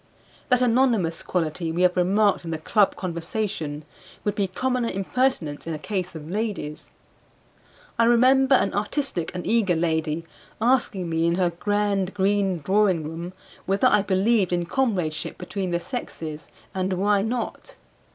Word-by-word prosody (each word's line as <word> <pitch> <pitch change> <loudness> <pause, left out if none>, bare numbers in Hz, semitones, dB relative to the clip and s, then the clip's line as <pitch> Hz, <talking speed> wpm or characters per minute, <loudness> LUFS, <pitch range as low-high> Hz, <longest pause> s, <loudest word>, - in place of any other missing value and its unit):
That 250 -1 +4
anonymous 230 -9 +2
quality 165 -1 -2
we 175 +3 0
have 180 0 +4
remarked 195 +2 +2
in 165 - -6
the 160 - -2
club 200 +6 +2
conversation 170 -4 -4 0.4
would 205 - 0
be 200 -1 0
common 250 +6 -1
impertinence 195 - -1
in 165 - -2
a - - -4
case 180 +1 -4
of 155 -1 -8
ladies. 200 -6 -4 1.1
I 230 - +6
remember 260 +3 +5
an 200 - +1
artistic 210 - -1
and 180 - -4
eager 220 -6 +2
lady 160 -1 -1 0.3
asking 230 -6 +1
me 165 0 +1
in 170 - +2
her 180 -1 +1
grand 200 +1 0
green 195 -3 +1
drawing 190 0 +2
room 165 +4 -6 0.3
whether 195 +1 +2
I 210 - +4
believed 195 0 +2
in 175 -1 0
comradeship 180 - -1
between 195 -3 -4
the 170 0 0
sexes, 165 - -6 0.3
and 190 0 -1
why 200 +2 +2
not. 230 +2 -4
190 Hz, 150 wpm, -24 LUFS, 170-215 Hz, 1.1 s, I